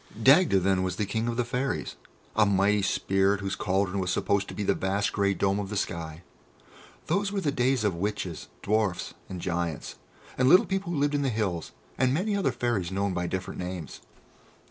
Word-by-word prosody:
Dagda 135 Hz, -, +6 dB
then 95 Hz, 0 st, +2 dB
was 95 Hz, -1 st, -1 dB
the 105 Hz, -, -1 dB
King 110 Hz, +3 st, -2 dB
of 120 Hz, 0 st, -2 dB
the 120 Hz, -, +1 dB
Fairies, 125 Hz, +3 st, -2 dB, 0.4 s
a 110 Hz, -, +5 dB
mighty 100 Hz, +1 st, +3 dB
spirit 95 Hz, 0 st, +1 dB
whose 100 Hz, -1 st, -3 dB
cauldron 95 Hz, 0 st, 0 dB
was 90 Hz, -1 st, -1 dB
supposed 100 Hz, +2 st, +1 dB
to -, -, -8 dB
be 105 Hz, -, -2 dB
the -, -, +2 dB
vast 100 Hz, +2 st, -1 dB
grey 100 Hz, -1 st, +1 dB
dome 100 Hz, +1 st, +1 dB
of 100 Hz, -2 st, -4 dB
the 105 Hz, -, -3 dB
sky. 85 Hz, -3 st, -4 dB, 0.8 s
Those 200 Hz, +5 st, 0 dB
were 200 Hz, -1 st, -1 dB
the 145 Hz, -, +1 dB
days 130 Hz, -2 st, +1 dB
of 105 Hz, -3 st, +2 dB
Witches, 90 Hz, -2 st, -3 dB, 0.2 s
Dwarfs, 105 Hz, -4 st, 0 dB, 0.2 s
and 90 Hz, -, -5 dB
Giants, 85 Hz, -3 st, -3 dB, 0.4 s
and 130 Hz, 0 st, +5 dB
little 180 Hz, -, +7 dB
people 190 Hz, -2 st, -2 dB
who 170 Hz, -, -1 dB
lived 145 Hz, +1 st, +1 dB
in 145 Hz, -, +1 dB
the 135 Hz, -, +1 dB
hills, 100 Hz, -8 st, -2 dB, 0.3 s
and 130 Hz, +1 st, +3 dB
many 200 Hz, +5 st, 0 dB
other 200 Hz, -, +1 dB
Fairies 105 Hz, -8 st, -1 dB
known 100 Hz, 0 st, 0 dB
by 90 Hz, 0 st, -1 dB
different 95 Hz, +1 st, -4 dB
names. 90 Hz, -4 st, -6 dB
100 Hz, 200 wpm, -27 LUFS, 95-125 Hz, 0.8 s, little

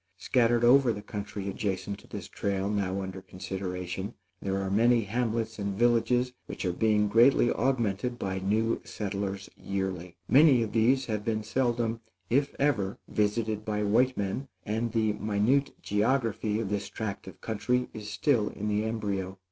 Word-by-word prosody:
Scattered 120 Hz, +3 st, +2 dB
over 125 Hz, +1 st, +6 dB
the 105 Hz, -2 st, -5 dB
country 100 Hz, -1 st, -5 dB
adjacent 100 Hz, 0 st, -3 dB
to -, -, -18 dB
this -, -, -7 dB
trail 100 Hz, 0 st, -2 dB
now 100 Hz, -2 st, -1 dB
under 95 Hz, 0 st, -6 dB
consideration, 95 Hz, +2 st, -5 dB, 0.3 s
there 95 Hz, 0 st, -1 dB
are 95 Hz, -1 st, -2 dB
many 115 Hz, +3 st, +4 dB
hamlets 115 Hz, +1 st, -2 dB
and 100 Hz, -1 st, -2 dB
villages 120 Hz, +2 st, +2 dB
which -, -, -5 dB
are 90 Hz, -, 0 dB
being 105 Hz, +1 st, +2 dB
greatly 120 Hz, +3 st, +5 dB
augmented 120 Hz, -2 st, 0 dB
by 95 Hz, -3 st, -2 dB
new 110 Hz, +4 st, +1 dB
settlers 100 Hz, -1 st, -4 dB
yearly. 95 Hz, -3 st, -4 dB
Many 135 Hz, -4 st, +6 dB
of 110 Hz, -, -4 dB
these 125 Hz, +4 st, +3 dB
have 105 Hz, -2 st, -2 dB
been 110 Hz, -1 st, -1 dB
seldom, 115 Hz, -1 st, 0 dB, 0.3 s
if 140 Hz, +3 st, +2 dB
ever, 110 Hz, -9 st, +1 dB
visited 105 Hz, 0 st, 0 dB
by 105 Hz, -1 st, -1 dB
white 125 Hz, +5 st, +3 dB
men, 100 Hz, +7 st, -2 dB, 0.2 s
and 110 Hz, +2 st, -1 dB
the 110 Hz, -2 st, +1 dB
minute 110 Hz, +7 st, +1 dB
geography 110 Hz, -1 st, +1 dB
of 110 Hz, -4 st, -2 dB
this 100 Hz, -1 st, -2 dB
tract 100 Hz, -3 st, -5 dB
of 95 Hz, -, -10 dB
country 115 Hz, +3 st, 0 dB
is 105 Hz, -1 st, -7 dB
still 105 Hz, +2 st, +1 dB
in 105 Hz, +1 st, -4 dB
the 105 Hz, +1 st, +1 dB
embryo. 100 Hz, -4 st, -2 dB
105 Hz, 160 wpm, -29 LUFS, 100-120 Hz, 0.3 s, over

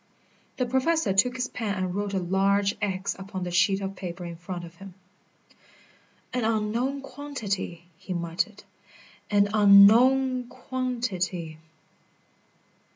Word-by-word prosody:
The 255 Hz, -, 0 dB
Professor 260 Hz, -2 st, +1 dB
took 245 Hz, +6 st, +3 dB
his 250 Hz, -1 st, -2 dB
pen 215 Hz, -4 st, -3 dB
and 185 Hz, -2 st, -2 dB
wrote 200 Hz, 0 st, -2 dB
a -, -, +1 dB
large 195 Hz, +2 st, +1 dB
X 190 Hz, -1 st, -2 dB
upon 190 Hz, -1 st, -6 dB
the 175 Hz, -, -4 dB
sheet 195 Hz, +3 st, +2 dB
of 195 Hz, 0 st, -4 dB
paper 180 Hz, -1 st, -6 dB
in 170 Hz, -1 st, -6 dB
front 175 Hz, +1 st, -7 dB
of 165 Hz, -, -13 dB
him. 195 Hz, -1 st, -12 dB, 1.4 s
"An 250 Hz, -2 st, -1 dB
unknown 230 Hz, +5 st, -1 dB
quantity!" 220 Hz, -12 st, -5 dB
he -, -, -9 dB
muttered. 175 Hz, +4 st, -3 dB, 0.7 s
"An 205 Hz, -1 st, +3 dB
unknown 240 Hz, +6 st, +6 dB
quantity!" 230 Hz, -11 st, -3 dB
200 Hz, 125 wpm, -26 LUFS, 185-245 Hz, 1.4 s, unknown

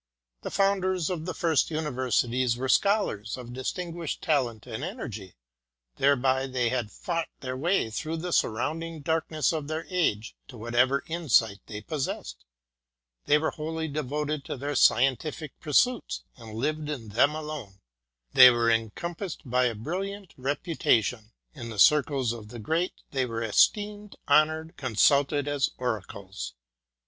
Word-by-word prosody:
The -, -, -5 dB
founders 190 Hz, -3 st, +1 dB
of 170 Hz, -2 st, -4 dB
the 180 Hz, -, -2 dB
first 165 Hz, -4 st, +2 dB
universities 130 Hz, -5 st, 0 dB
were 130 Hz, +2 st, -2 dB
Scholars 130 Hz, -, +1 dB
of 120 Hz, -1 st, -9 dB
distinguished 165 Hz, +5 st, -4 dB
talent 125 Hz, -8 st, 0 dB
and 110 Hz, +5 st, -6 dB
energy, 115 Hz, -, -6 dB, 0.6 s
whereby 135 Hz, -1 st, +2 dB
they 125 Hz, -2 st, 0 dB
had 120 Hz, -4 st, -1 dB
fought 165 Hz, -2 st, -3 dB
their 130 Hz, -1 st, -4 dB
way 160 Hz, -3 st, +1 dB
through 160 Hz, +8 st, -3 dB
the 175 Hz, +1 st, -3 dB
surrounding 155 Hz, +8 st, -1 dB
darkness 160 Hz, 0 st, 0 dB
of 155 Hz, -3 st, -3 dB
their 155 Hz, +1 st, -3 dB
age 120 Hz, -, 0 dB
to 125 Hz, -, -11 dB
whatever 120 Hz, +4 st, +1 dB
insight 125 Hz, -11 st, +2 dB
they 105 Hz, -2 st, -6 dB
possessed; 105 Hz, -, -4 dB, 0.8 s
they 150 Hz, -, +6 dB
were 155 Hz, -, 0 dB
wholly 160 Hz, +1 st, -4 dB
devoted 150 Hz, 0 st, -2 dB
to -, -, -5 dB
their 145 Hz, +3 st, -3 dB
scientific 135 Hz, +4 st, +2 dB
pursuits, 230 Hz, -, +1 dB
and 110 Hz, -3 st, -11 dB
lived 150 Hz, +5 st, -2 dB
in 125 Hz, -8 st, -5 dB
them 140 Hz, +8 st, +3 dB
alone; 150 Hz, -11 st, -7 dB, 0.5 s
they 130 Hz, -1 st, +11 dB
were 120 Hz, -1 st, +2 dB
encompassed 160 Hz, -, -3 dB
by 125 Hz, +1 st, +2 dB
a 120 Hz, -2 st, 0 dB
brilliant 190 Hz, -, -5 dB
reputation; 125 Hz, -, 0 dB, 0.2 s
in 120 Hz, -6 st, -7 dB
the 110 Hz, -, -7 dB
circles 140 Hz, 0 st, +4 dB
of 110 Hz, -3 st, -9 dB
the 120 Hz, +3 st, -9 dB
great 160 Hz, -, -1 dB, 0.2 s
they 130 Hz, -2 st, 0 dB
were 115 Hz, -1 st, -3 dB
esteemed, 205 Hz, -, +2 dB
honoured, 155 Hz, +2 st, +3 dB
consulted 140 Hz, +3 st, +3 dB
as 145 Hz, -1 st, +1 dB
oracles. 100 Hz, -, -5 dB
140 Hz, 140 wpm, -27 LUFS, 120-160 Hz, 0.8 s, they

